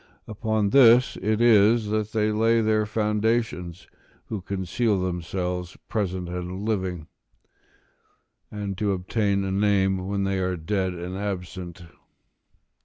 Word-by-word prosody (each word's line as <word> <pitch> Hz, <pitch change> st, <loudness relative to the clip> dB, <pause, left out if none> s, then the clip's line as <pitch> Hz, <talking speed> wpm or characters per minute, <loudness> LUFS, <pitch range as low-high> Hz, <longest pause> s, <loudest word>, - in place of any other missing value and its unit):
Upon 110 Hz, -1 st, -1 dB
this 125 Hz, -1 st, +6 dB
it 110 Hz, +2 st, 0 dB
is 110 Hz, -1 st, +5 dB
that 110 Hz, 0 st, -1 dB
they 110 Hz, -1 st, +1 dB
lay 115 Hz, +2 st, +3 dB
their 110 Hz, -1 st, +1 dB
foundation 105 Hz, -4 st, -1 dB, 0.5 s
who 105 Hz, -3 st, -4 dB
conceal 100 Hz, +3 st, -1 dB
themselves 90 Hz, 0 st, -3 dB
present 95 Hz, -5 st, -2 dB
and 90 Hz, +3 st, -5 dB
living, 95 Hz, -6 st, -2 dB, 1.7 s
to 100 Hz, -1 st, 0 dB
obtain 100 Hz, +2 st, 0 dB
a 95 Hz, -, -2 dB
name 95 Hz, -2 st, +1 dB
when 100 Hz, 0 st, -1 dB
they 95 Hz, 0 st, 0 dB
are 90 Hz, -1 st, -1 dB
dead 95 Hz, +2 st, -2 dB
and 90 Hz, +2 st, -6 dB
absent. 90 Hz, -3 st, -5 dB
100 Hz, 115 wpm, -25 LUFS, 90-110 Hz, 1.7 s, this